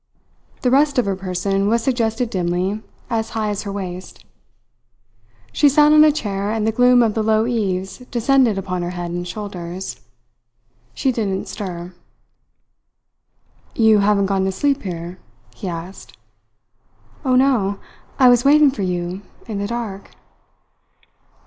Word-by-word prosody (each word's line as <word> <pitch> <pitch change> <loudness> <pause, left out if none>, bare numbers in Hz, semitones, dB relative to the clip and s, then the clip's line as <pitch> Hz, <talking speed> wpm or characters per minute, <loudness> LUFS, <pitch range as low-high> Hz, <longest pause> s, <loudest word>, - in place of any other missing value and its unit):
The 250 - +2
rest 285 +1 +3
of 250 - +3
her 195 -1 -1
person 195 +1 -1
was 230 +2 +1
suggested 235 -2 0
dimly 185 +3 -1 0.3
as 225 -2 -2
high 215 -1 0
as 205 - -3
her 200 - -5
waist. 185 -2 -7 1.3
She 290 - +4
sat 295 +2 +5
on 305 0 +7
a 310 - +6
chair, 205 -8 -3
and 220 0 -1
the 220 - +2
gloom 245 +1 +5
of 220 -2 +1
the 220 - -1
low 220 0 +2
eaves 195 -5 -2
descended 245 -2 +2
upon 185 -2 -3
her 175 - -3
head 175 -1 -4
and 175 0 -4
shoulders. 185 -2 -6 0.9
She 265 - +1
didn't 200 -5 -2
stir. 180 -3 -6 1.8
"You 220 -2 +5
haven't 200 0 +3
gone 195 -1 0
to 190 - 0
sleep 280 +8 0
here?" 175 -1 -6 0.3
he 195 - -7
asked. 175 +2 -8 1.1
"Oh, 260 -2 +2
no! 245 -7 +2 0.4
I 260 - +6
was 245 -1 +5
waiting 290 0 +6
for 260 - -6
you 180 0 -3 0.2
in 215 -4 -4
the 200 - -2
dark." 220 -4 -5
205 Hz, 145 wpm, -20 LUFS, 185-245 Hz, 1.8 s, on